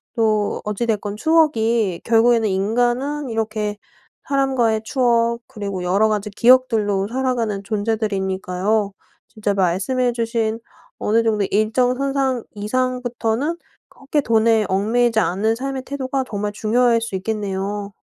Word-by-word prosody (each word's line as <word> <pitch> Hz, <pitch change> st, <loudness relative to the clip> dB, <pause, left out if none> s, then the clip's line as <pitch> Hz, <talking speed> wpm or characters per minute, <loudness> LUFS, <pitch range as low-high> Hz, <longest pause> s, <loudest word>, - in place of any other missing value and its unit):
또 215 Hz, -3 st, +1 dB
어찌 210 Hz, +3 st, -2 dB
됐건 210 Hz, -1 st, -2 dB
추억이 230 Hz, -, +2 dB
결국에는 230 Hz, -1 st, +4 dB
인간은 245 Hz, +9 st, 0 dB
이렇게 215 Hz, -2 st, -2 dB, 0.5 s
사람과의 260 Hz, -6 st, +1 dB
추억 235 Hz, -2 st, +1 dB
그리고 200 Hz, -3 st, -5 dB
여러 200 Hz, +5 st, +3 dB
가지 210 Hz, 0 st, -1 dB
기억들로 215 Hz, -4 st, +3 dB
살아가는 240 Hz, -5 st, -1 dB
존재들이니까요. 200 Hz, -1 st, -1 dB, 0.3 s
진짜 210 Hz, -3 st, -2 dB
말씀해 200 Hz, +7 st, +1 dB
주신 230 Hz, -1 st, -1 dB, 0.4 s
어느 225 Hz, +2 st, +2 dB
정도 215 Hz, -3 st, +1 dB
일정 225 Hz, +4 st, +2 dB
선상 270 Hz, -3 st, 0 dB
이상부터는 250 Hz, +5 st, -1 dB, 0.3 s
그렇게 285 Hz, +2 st, -2 dB
돈에 225 Hz, -2 st, +3 dB
얽매이지 220 Hz, +4 st, +2 dB
않은 220 Hz, +3 st, +1 dB
삶의 265 Hz, +1 st, -4 dB
태도가 270 Hz, -1 st, -2 dB
정말 205 Hz, 0 st, -3 dB
중요할 230 Hz, +2 st, +2 dB
수 230 Hz, -4 st, -4 dB
있겠네요. 200 Hz, 0 st, -3 dB
225 Hz, 305 characters per minute, -20 LUFS, 205-245 Hz, 0.5 s, 결국에는